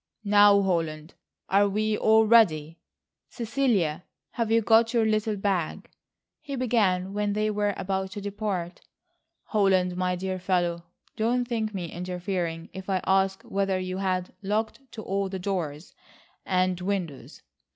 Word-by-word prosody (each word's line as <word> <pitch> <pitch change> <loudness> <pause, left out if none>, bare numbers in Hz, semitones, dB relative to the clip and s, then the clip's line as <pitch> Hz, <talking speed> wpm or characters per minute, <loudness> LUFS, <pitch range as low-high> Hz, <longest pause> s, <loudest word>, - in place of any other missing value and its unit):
"Now, 205 0 +6
Holland, 165 -4 -2 0.3
are 200 +1 +3
we 215 +2 0
all 220 +1 +4
ready? 165 -9 +3 0.5
Cecilia, 225 - 0 0.3
have 230 -2 -2
you 230 - +5
got 225 +2 +4
your 230 -1 +3
little 215 0 +1
bag?" 195 -5 -2 0.5
he 280 -3 -5
began 205 -7 +1
when 205 0 -1
they 215 +1 0
were 205 -1 0
about 190 0 -2
to 205 - -5
depart. 200 -4 -4 0.6
"Holland, 190 -4 +2
my 180 0 0
dear 185 +1 -3
fellow, 175 -2 0 0.3
don't 240 +2 0
think 220 -3 -2
me 175 -3 -4
interfering 180 -2 -4
if 190 0 -8
I 190 -2 +1
ask 190 0 +1
whether 195 -1 -1
you 185 0 -4
have 185 -2 -1
looked 210 +3 -1
to 220 - -7
all 195 0 -1
the 190 - -4
doors 180 -5 -4 0.5
and 185 -1 +1
windows? 180 -7 -4
195 Hz, 140 wpm, -26 LUFS, 180-215 Hz, 0.6 s, Now